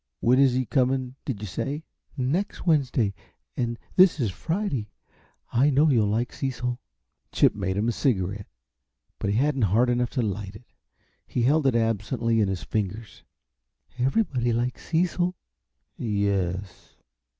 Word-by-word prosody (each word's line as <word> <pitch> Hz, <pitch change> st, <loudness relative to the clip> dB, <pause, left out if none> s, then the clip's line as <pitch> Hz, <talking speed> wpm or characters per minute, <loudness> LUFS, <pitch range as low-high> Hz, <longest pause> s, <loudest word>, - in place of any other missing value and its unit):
When 125 Hz, +3 st, +3 dB
is 135 Hz, -2 st, +5 dB
he 130 Hz, 0 st, 0 dB
coming, 130 Hz, 0 st, +1 dB
did 115 Hz, -8 st, -4 dB
you -, -, -4 dB
say?" 140 Hz, -, -4 dB, 0.3 s
"Next 150 Hz, +13 st, -1 dB
Wednesday 130 Hz, -, +2 dB, 0.4 s
and 120 Hz, -1 st, -2 dB, 0.2 s
this 185 Hz, -3 st, +6 dB
is 115 Hz, -7 st, 0 dB
Friday. 160 Hz, -, -2 dB, 0.6 s
I 130 Hz, +5 st, +4 dB
know 145 Hz, +2 st, +4 dB
you'll 110 Hz, -5 st, +3 dB
like 115 Hz, +3 st, -1 dB
Cecil." 125 Hz, -2 st, -3 dB, 0.5 s
Chip -, -, +4 dB
made 95 Hz, +1 st, -2 dB
him 105 Hz, +3 st, +1 dB
a -, -, +3 dB
cigarette, 100 Hz, -6 st, -1 dB, 0.7 s
but 100 Hz, -, -1 dB
he 100 Hz, -, +1 dB
hadn't 135 Hz, +2 st, +1 dB
heart 120 Hz, +5 st, +3 dB
enough 120 Hz, 0 st, +1 dB
to 125 Hz, -, +2 dB
light 100 Hz, -1 st, -4 dB
it. 120 Hz, -, -13 dB, 0.6 s
He 120 Hz, -, -1 dB
held 145 Hz, +3 st, +3 dB
it 130 Hz, -, +2 dB
absently 115 Hz, +1 st, +1 dB
in 105 Hz, -, +2 dB
his 95 Hz, -2 st, -3 dB
fingers. 105 Hz, +1 st, -4 dB, 0.8 s
"Everybody 130 Hz, -, +1 dB
likes 120 Hz, +2 st, -2 dB
Cecil." 175 Hz, +2 st, +1 dB, 0.6 s
"Yes?" 100 Hz, -4 st, -2 dB
120 Hz, 145 wpm, -26 LUFS, 105-135 Hz, 0.8 s, this